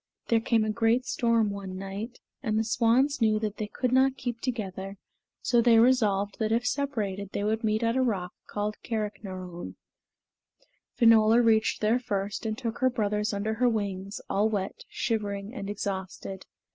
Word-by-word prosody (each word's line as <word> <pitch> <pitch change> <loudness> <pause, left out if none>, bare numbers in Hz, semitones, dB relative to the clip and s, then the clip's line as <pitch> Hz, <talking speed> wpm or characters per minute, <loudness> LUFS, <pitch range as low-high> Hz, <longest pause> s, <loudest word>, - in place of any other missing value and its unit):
There 230 - +4
came 225 -1 +2
a 215 - 0
great 230 +3 +2
storm 230 -4 +2
one 195 -2 -6
night, 200 +5 -6 0.2
and 215 -4 0
the 220 - +2
swans 240 +5 +2
knew 215 -1 +4
that 215 -1 -3
they 215 - -3
could 250 +3 -2
not 265 +1 +3
keep 240 -2 -4
together, 195 -5 -4 0.5
so 240 -1 +3
they 230 -1 +5
resolved 215 -5 +3
that 220 -1 0
if 235 +2 +1
separated 215 -8 -2
they 200 - -1
would 220 +2 0
meet 215 +1 +1
at 230 +1 +1
a 260 - +2
rock 195 -8 -1
called 210 +1 -3
Carricknarone. 190 -5 -5 1.2
Finola 225 -1 +6
reached 220 -1 +3
there 220 +3 +3
first, 200 -2 -3
and 215 0 -2
took 230 -2 -4
her 260 -1 +4
brothers 210 -3 0
under 205 +2 -1
her 245 +2 +2
wings, 200 -2 -3
all 210 +2 +2
wet, 200 -3 -3
shivering, 205 -2 -2
and 200 -6 -5
exhausted. 190 -1 -5
220 Hz, 170 wpm, -28 LUFS, 200-235 Hz, 1.2 s, Finola